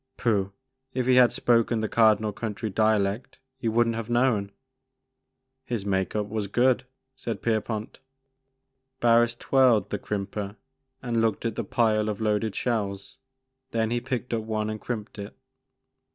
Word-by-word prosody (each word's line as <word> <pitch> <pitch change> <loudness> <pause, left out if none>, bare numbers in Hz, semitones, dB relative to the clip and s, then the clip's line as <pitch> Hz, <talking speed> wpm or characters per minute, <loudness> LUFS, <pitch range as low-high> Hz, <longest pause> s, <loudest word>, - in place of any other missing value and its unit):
Pooh! 100 -5 +1 0.4
If 130 -1 0
he 130 - +4
had 125 -1 +7
spoken 115 -1 +2
the 110 - 0
Cardinal 110 -1 +3
County 110 0 -4
dialect 110 +1 +1 0.2
you 115 -3 -1
would 120 +1 +3
n't 115 - 0
have 115 0 -5
known." 120 -5 +2 1.1
His 120 -6 -4
make 95 -2 -1
up 105 -1 0
was 105 0 -3
good," 125 +4 +2 0.3
said 115 -5 -5
Pierpont. 110 -1 -2 1.0
Barris 120 0 +4
twirled 120 -6 +3
the 105 - -2
crimper 100 0 -4 0.5
and 115 -2 0
looked 115 0 0
at 115 -2 -1
the 115 - -2
pile 110 0 +1
of 105 - -3
loaded 110 -1 0
shells. 100 -5 -2 0.5
Then 115 -2 0
he 120 0 0
picked 125 -1 -3
up 115 - 0
one 110 -1 -2
and 110 - -6
crimped 110 -2 -5
it. 100 +1 -8
110 Hz, 150 wpm, -26 LUFS, 105-120 Hz, 1.1 s, had